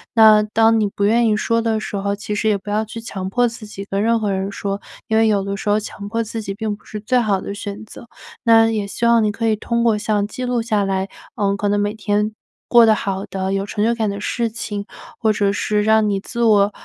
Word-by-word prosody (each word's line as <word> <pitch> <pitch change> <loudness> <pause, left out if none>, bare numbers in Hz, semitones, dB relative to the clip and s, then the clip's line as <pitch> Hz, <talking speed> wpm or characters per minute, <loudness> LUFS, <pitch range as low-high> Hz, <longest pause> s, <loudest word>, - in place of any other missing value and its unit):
那 215 -2 +7
当 225 +1 +3
你 210 - +2
不 200 - -4
愿 230 +2 +3
意 215 - +3
说 230 +1 +1
的 225 -1 0
时 210 - -6
候， 200 +1 -1
其 210 +1 -5
实 220 +1 -1
也 205 - +2
不 205 +2 -10
要 215 +1 +1
去 230 +2 -8
强 190 -4 -5
迫 245 +4 +2
自 230 -2 -8
己 200 -1 -8
跟 200 0 -2
任 230 +1 +2
何 210 -2 -1
人 190 +1 -2
说， 200 0 -4 0.3
因 220 - 0
为 225 - +4
有 205 -2 +2
的 200 0 -3
时 205 - -3
候 210 - +3
强 200 -1 -8
迫 230 +1 -1
自 225 +1 -5
己 195 -2 -5
并 215 0 -3
不 205 - -23
是 210 - -6
最 250 +4 +1
好 205 -4 +1
的 200 - -5
选 205 0 -6
择， 235 - -12 0.4
那 225 -1 +6
也 210 -2 -2
希 235 - -3
望 235 -1 +5
你 210 - +1
可 225 +1 -2
以 215 - +3
通 235 +2 -1
过 225 -3 +3
像 210 -1 0
记 250 +4 -5
录 245 -2 0
下 215 -3 0
来， 195 0 -1 0.3
呃， 200 -3 0
可 205 - -1
能 205 - +1
每 205 +1 0
天 210 0 0 0.4
过 235 -1 +7
得 220 - +5
好 195 -1 -3
的， 190 0 -3
有 195 0 -1
成 205 +1 -2
就 235 +1 +3
感 220 -3 -1
的 200 0 -6
事 235 +1 -1
情， 205 -2 -5 0.3
或 220 -2 +2
者 200 -1 +1
是 210 +1 0
让 220 0 +4
你 195 -1 0
自 235 +2 -3
我， 205 -2 +4
210 Hz, 285 characters per minute, -20 LUFS, 200-225 Hz, 0.4 s, 那